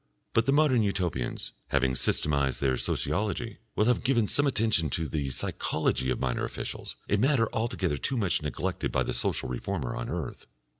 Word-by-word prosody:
But 115 - +2
the - - +4
modern 140 -4 +4
Utopians, 90 - -1 0.2
having 65 -2 +2
systematised 70 0 +1
their 65 -2 +2
sociology, 105 - -1 0.2
will 105 - +3
have 125 +1 +2
given 120 -5 +2
some 145 +6 +4
attention 110 - +2
to 80 +4 -1
the 70 -2 -2
psychology 65 0 -1
of 65 - 0
minor 65 -2 -1
officials, - - -5
a 105 - +2
matter 125 0 +3
altogether 100 -9 -1
too 130 - 0
much 95 -9 +2
neglected 75 -4 -2
by - - +1
the - - -2
social - - 0
reformer 65 +2 -3
on - - -4
earth. - - -5
95 Hz, 170 wpm, -28 LUFS, 70-115 Hz, 0.2 s, the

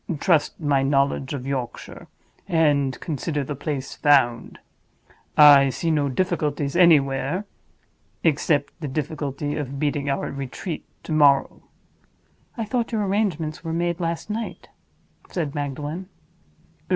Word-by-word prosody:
Trust 165 -4 +2
my 145 -4 +2
knowledge 135 -1 +1
of 130 -2 -6
Yorkshire, 135 -3 -5 0.4
and 145 -6 +2
consider 150 -1 -3
the 145 +2 -5
place 140 -1 -4
found. 130 -5 +2 0.8
I 145 -2 +8
see 165 +5 -1
no 145 -2 +1
difficulties 150 -2 -1
anywhere, 155 +1 +3 0.8
except 145 -2 +1
the 150 - -3
difficulty 145 0 -3
of 140 -2 -4
beating 145 -1 -1
our 135 - -2
retreat 140 +5 -6 0.2
to - - -7
morrow." 145 -3 +3 1.0
"I 225 - -2
thought 235 +2 -2
your 215 -3 0
arrangements 175 -7 -1
were 165 -1 -3
made 170 +1 -1
last 170 -1 -3
night?" 225 +2 -5 0.6
said 155 -6 -3
Magdalen. 145 +5 -4
145 Hz, 120 wpm, -23 LUFS, 140-165 Hz, 1.0 s, I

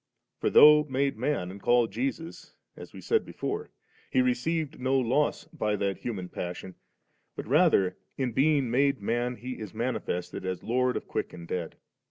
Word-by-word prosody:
For - - +1
though 150 0 +8
made 140 0 0
man, 110 -6 -2
and 100 +1 -11
called 120 -1 +3
Jbsus, 135 +9 -5 0.2
as - - -11
we - - -11
said 450 -1 +1
before^ 435 +2 -4 0.4
He 260 - +3
received 165 - -1
no 130 +1 +1
loss 130 +4 +1
by 105 -9 0
that 100 -1 -2
hu 120 - -3
man 90 -3 -6
passion, 90 +1 -6 0.6
but - - -6
rather, 140 - +3 0.2
in 130 -3 -1
being 135 0 +2
made 140 +2 +2
man, 120 +4 -1
He 125 +1 -7
is 110 -2 -8
manifested 115 -7 -3
as 95 -1 -4
Lord 125 +2 +1
of - - -7
quick - - -3
and 85 -1 -10
dead. 85 -2 -4
125 Hz, 175 wpm, -28 LUFS, 105-145 Hz, 0.6 s, though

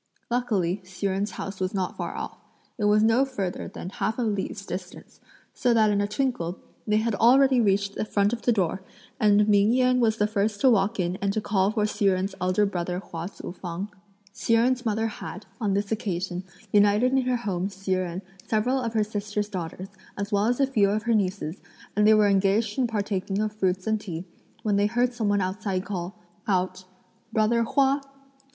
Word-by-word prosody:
Luckily 205 -7 0
Hsi 185 +2 -7
Jen's 195 +2 0
house 195 0 -6
was 185 +1 -2
not 185 -2 -2
far - - -4
off. - - -6 0.4
It 210 - +1
was 210 +1 +4
no 225 +4 +4
further 200 -9 -3
than 180 - -7
half 220 +3 -2
a 250 - 0
li's 205 -2 -2
distance, 180 -1 -8 0.3
so 245 -2 +2
that 215 -2 +4
in 205 0 +2
a 205 - 0
twinkle 210 -6 -1 0.3
they 210 0 +3
had 225 +1 0
already 255 +4 +5
reached 200 -1 +1
the - - -2
front 205 0 +1
of 235 - -3
the 245 - +2
door, 190 -3 0 0.4
and 210 -1 +4
Ming 205 +1 +4
Yen 255 0 +3
was 225 -2 +2
the 210 - +2
first 210 0 0
to 265 - +6
walk 210 0 +2
in 180 0 0
and 200 0 0
to 215 - 0
call 200 -2 +1
for 215 -1 +1
Hsi 210 0 -1
Jen's 190 0 +2
eldest 185 +3 +2
brother 175 -1 -2
Hua 170 -2 -6
Tzu 195 - -8
fang. 180 +2 -5 0.4
Hsi 230 - +1
Jen's 245 +2 +2
mother 220 +1 0
had, 210 -2 -6
on 205 -3 0
this 200 +1 -1
occasion, 190 -4 -2 0.3
united 205 +4 +4
in 265 0 +3
her 250 -1 +1
home 195 -5 -2
Hsi 195 -1 -3
Jen, 185 0 -2 0.2
several 245 +5 +1
of 230 -2 -3
her 215 - +3
sister's 205 0 -3
daughters, 185 0 -5 0.3
as 200 +1 -3
well 205 +1 +2
as 245 +2 +1
a 275 - +5
few 220 -7 +2
of 210 +1 0
her 235 - +1
nieces, 190 -4 -1 0.4
and 210 +1 +4
they 220 - +7
were 210 -1 +5
engaged 200 +4 +2
in 250 - +3
partaking 200 -3 -2
of 215 0 -1
fruits 190 -3 -1
and 220 -1 0
tea, 175 -3 -6 0.4
when 210 -3 +1
they 205 0 +3
heard 245 +3 +1
some 225 -4 -1
one 205 -1 +2
outside 190 0 -2
call 185 0 -4 0.3
out, 185 -1 0 0.5
"Brother 220 +1 +2
Hua." 275 +4 +2
205 Hz, 205 wpm, -26 LUFS, 190-225 Hz, 0.5 s, they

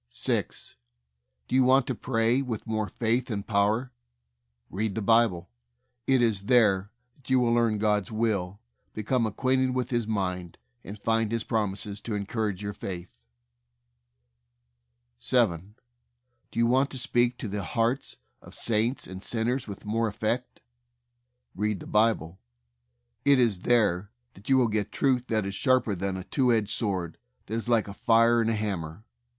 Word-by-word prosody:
6. - - -3 0.7
Do - - -7
you 130 0 +5
want 130 0 +4
to 130 - -2
pray 115 +2 +1
with 120 -5 -4
more 110 -2 -2
faith 120 +2 0
and 100 -3 -3
power? 110 +4 +1 0.8
Read 105 +1 -2
the 110 - -2
Bible. 105 - +2 0.6
It 130 -2 +4
is 105 -4 +1
there 105 -6 +3 0.3
that 135 -3 -16
you 130 0 +4
will 120 -1 +2
learn 115 -2 +2
God's 105 -2 0
will, 105 -4 -1 0.4
become 115 +2 0
ac 105 - -6
quainted 130 -1 +1
with 130 0 -2
His 120 -3 0
mind, 90 -5 -3 0.3
and 100 +3 -8
find 115 0 0
His 115 -1 -1
prom 105 -4 -1
ises 100 0 -5
to 110 - -4
encourage 105 -1 -3
your 100 0 -3
faith. 90 -8 -8 1.9
7. 100 - 0 0.7
Do - - -12
you 115 - +4
want 130 +4 +2
to 130 - -6
speak 120 0 +1
to 120 - -5
the 100 0 -3
hearts 115 +7 -1 0.2
of - - -12
saints 115 +3 +1
and 95 0 -8
sinners 120 +4 -1
with 100 -1 -9
more 115 +2 0
effect? 110 +4 -3 0.9
Read 105 0 -1
the - - -10
Bible. 105 -6 +1 0.8
It 140 -1 +5
is 115 -7 +3
there 105 -4 +2 0.2
that 100 +5 -13
you 135 - +5
will 125 -2 +4
get 105 -2 -1
truth 130 -3 +1
that 110 -3 0
is 100 - -4
sharper 130 -3 +2
than 95 0 -2
a 95 - -6
two 125 +4 +1
edged 110 -3 +1
sword, 95 -7 -2 0.3
that - - -8
is 115 +1 -3
like 115 -3 +2
a 100 - -7
fire 115 +2 +4
and 115 - +1
a 115 - +1
hammer. 100 -3 -4
110 Hz, 165 wpm, -27 LUFS, 100-120 Hz, 1.9 s, you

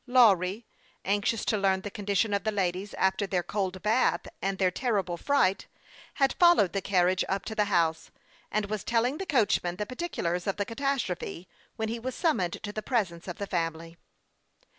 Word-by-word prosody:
Lawry, 215 -4 +4 0.4
anxious 205 +3 0
t<? - - +1
learn 195 -2 +2
the 205 - -6
condition 205 +1 0
of 200 -2 0
the 215 - 0
ladies 190 0 -2
after 190 +1 +1
their 180 -2 0
cold 190 -2 -3
bath, 220 +4 +2 0.2
and 195 0 -1
their 185 -2 +2
terrible 195 -5 -1
fright, 195 -2 +1 0.5
had 275 -1 +2
followed 345 - +5
the 195 - -1
carriage 185 -1 +2
up 195 +1 -1
to 220 - -4
the 210 -1 +2
house, 170 -5 +1 0.4
and 215 0 0
was 210 -1 -4
telling 240 +5 +1
the 385 - -4
coachman 205 - +2
the 210 - -3
particulars 205 - -3
of 195 - -1
the 205 - -1
catastrophe 230 -8 -3 0.3
when 220 - -2
he 230 +2 -3
was 255 +2 -4
sum 325 -3 +2
moned 175 -2 -2
to 205 - -5
the 215 - -3
presence 195 -9 -1
of 175 - -5
the 200 - -3
family. 165 -2 -3
200 Hz, 185 wpm, -28 LUFS, 185-230 Hz, 0.5 s, followed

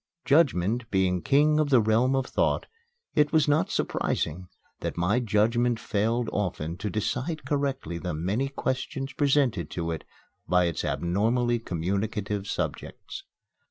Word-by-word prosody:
Judgment 120 - +2
being 95 -2 +1
King 150 - +3
of 150 -2 +1
the 130 -3 +6
Realm 115 +4 +3
of 135 -1 0
Thought, - - 0 0.5
it 150 -1 +3
was 155 -2 +3
not 145 +2 +2
surprising 90 +4 -1 0.3
that - - -4
my 95 +8 +2
judgment 115 +1 +2
failed 115 +3 0
often 85 -5 -2
to 105 +3 -3
decide 130 - -2
correctly 135 - -2
the 90 -2 -3
many 100 - -1
questions 135 0 -3
presented 135 - +1
to 85 -1 -3
it 80 - -4 0.4
by 90 0 +4
its 85 -2 -2
abnormally 115 +7 +1
communicative 100 +2 -2
subjects. - - -5
110 Hz, 135 wpm, -27 LUFS, 90-135 Hz, 0.5 s, the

